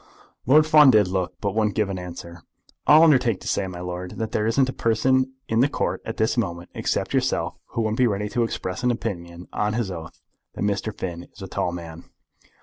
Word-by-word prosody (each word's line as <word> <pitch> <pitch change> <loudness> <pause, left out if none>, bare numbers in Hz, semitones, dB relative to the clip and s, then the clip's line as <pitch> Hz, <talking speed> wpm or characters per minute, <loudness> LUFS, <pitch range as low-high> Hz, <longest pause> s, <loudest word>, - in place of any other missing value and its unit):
Lord 150 +4 +6
Fawn 150 -2 +7
did 105 -6 +5
look, 90 -1 -2
but 100 -2 -1
wouldn't 105 -1 +1
give 105 -2 +1
an 95 - -4
answer. 85 -1 -9 0.5
"I'll 155 +2 +8
undertake 125 - +4
to - - -8
say, 95 - 0
my 90 -1 -7
lord, 90 0 -6
that 110 -1 -3
there 105 0 0
isn't 130 +4 +3
a 130 - -4
person 130 +3 +1
in 115 - +1
the 135 +4 +4
Court - - -2
at - - -5
this 110 +2 +1
moment, 85 -6 -3
except - - -2
yourself, - - 0
who 115 - -3
wouldn't 110 +2 -1
be 125 - +5
ready 105 -1 -1
to 120 - -1
express 95 -4 -4
an 125 - +2
opinion 90 -7 -4
on 105 0 0
his 110 -4 -1
oath 80 -3 -8 0.4
that - - -3
Mr. 105 +1 -1
Finn 85 -4 -6
is 100 - -12
a - - -6
tall 90 - -2
man. 85 -1 -8
105 Hz, 220 wpm, -24 LUFS, 90-120 Hz, 0.5 s, I'll